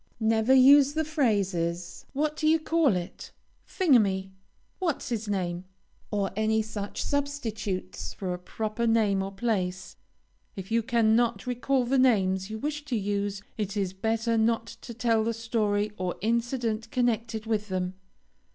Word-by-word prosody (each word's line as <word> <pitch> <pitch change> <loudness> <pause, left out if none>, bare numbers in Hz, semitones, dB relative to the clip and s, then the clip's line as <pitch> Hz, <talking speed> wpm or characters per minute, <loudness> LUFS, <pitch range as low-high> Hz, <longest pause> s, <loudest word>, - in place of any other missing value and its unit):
Never 220 +3 +3
use 275 +2 +7
the 315 0 0
phrases, 195 - -1
"What 300 +2 0
d 310 - 0
ye 320 +1 +5
call 320 - +2
it," 175 -1 -6 0.4
"Thingummy," 205 - +2 0.5
"What's 340 -7 -2
his 225 -2 -3
name," 180 -3 -2 0.4
or 200 -2 -1
any 220 +1 +1
such 210 -2 -5
substitutes 230 -10 -3
for 185 -2 -4
a 180 - -5
proper 215 +5 -3
name 215 -4 +3
or 195 0 -4
place. 190 -3 -2 0.6
If 190 +2 -8
you 230 0 +3
cannot 230 -1 +2
recall 250 +1 0
the 265 +2 +2
names 190 -6 +2
you 220 - -4
wish 295 +5 -3
to 265 -5 -2
use, 200 -1 -2 0.2
it 205 0 -2
is 190 -2 -1
better 225 +3 0
not 225 0 +2
to 235 +1 -10
tell 230 -2 +2
the 230 +1 -1
story 215 -2 0
or 180 -1 -2
incident 230 0 -1
connected 230 -2 -1
with 215 -2 -1
them. 185 -1 -2
220 Hz, 150 wpm, -27 LUFS, 195-245 Hz, 0.6 s, use